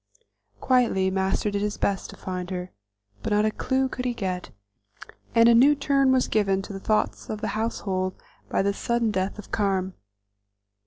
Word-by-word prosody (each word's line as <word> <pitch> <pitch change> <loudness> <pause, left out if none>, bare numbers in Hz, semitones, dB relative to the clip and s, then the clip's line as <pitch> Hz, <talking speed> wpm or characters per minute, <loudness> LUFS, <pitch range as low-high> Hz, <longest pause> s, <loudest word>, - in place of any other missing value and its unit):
Quietly 235 -7 +2
Master 190 +2 0
did 200 0 -1
his 210 0 -2
best 195 -2 -1
to - - -11
find 180 -1 -5
her, 180 -1 -5 0.5
but - - -3
not 210 +1 +3
a 215 - +2
clew 265 +4 0
could 250 0 -5
he 245 -1 -1
get, 185 -4 -3 0.9
and 230 0 +7
a 235 - +7
new 270 +6 +6
turn 275 -1 +2
was 260 -1 +3
given 195 -3 +1
to 200 - -8
the 195 - -5
thoughts 215 +2 -1
of 215 - -3
the - - -1
household 190 -4 -2 0.3
by - - +1
the 200 0 +1
sudden 235 +1 0
death 190 0 -2
of 210 - -11
Carm. 190 -3 0
210 Hz, 180 wpm, -25 LUFS, 190-235 Hz, 0.9 s, and